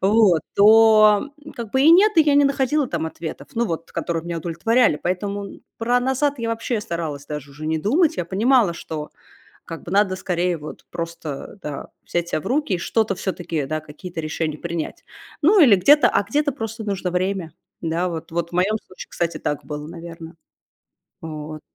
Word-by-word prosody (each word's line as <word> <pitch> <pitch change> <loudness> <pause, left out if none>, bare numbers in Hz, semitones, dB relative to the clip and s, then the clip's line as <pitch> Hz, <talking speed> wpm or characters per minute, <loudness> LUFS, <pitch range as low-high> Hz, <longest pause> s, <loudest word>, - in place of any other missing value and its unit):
вот, 195 -4 +4
то, 215 +3 +6
м, 300 - -10
как 230 -3 -7
бы 265 - +2
и 310 - +7
нет, 400 +5 +6
и 320 - +8
я 295 -2 +3
не 285 - +6
находила 275 +1 +1
там 165 -5 -3
ответов, 160 0 -7
ну 235 0 +1
вот 165 -3 -5
которые 165 -1 -3
меня 170 -1 -3
удовлетворяли. 175 +6 +2
Поэтому, 200 +3 -2
м, - - -16 0.2
про 240 +2 +2
"назад" 265 +3 +1
я 230 -1 -2
вообще 230 0 -2
старалась 165 -8 -5
даже 150 -2 -6
уже 150 +3 -8
не 160 0 0
думать. 290 - +2
Я 180 - -1
понимала, 210 0 +3
что 155 -2 -6 0.6
как 165 - -8
бы 170 - -8
надо 195 -1 +3
скорее 180 -1 -1
вот 150 0 -10
просто, 165 0 -6
да, 150 -2 -6
взять 175 0 -2
себя 155 - -1
в - - -7
руки 270 -5 0
и - - +1
что-то 220 +3 0
всё-таки, 175 -5 -3
да, 155 +3 -3
какие-то 155 +3 -9
решения 155 0 -3
принять. 170 0 -5 0.4
Ну, 390 +7 +6
или 235 -9 +8
где-то 285 +11 +5
а - - +1
где-то 290 +8 0
просто 225 -3 -5
нужно 195 -3 -2
время. 180 -3 -2 0.3
Да, 170 +2 -1
вот, 165 -2 -6
вот 170 0 -2
в - - -18
моем 190 +5 +2
случае, 185 - -10
кстати, 170 -1 -2
так 145 - -3
было, 150 0 -6
наверно. 165 -1 -9 0.9
Вот. 155 -1 -7
185 Hz, 190 wpm, -22 LUFS, 165-225 Hz, 0.9 s, и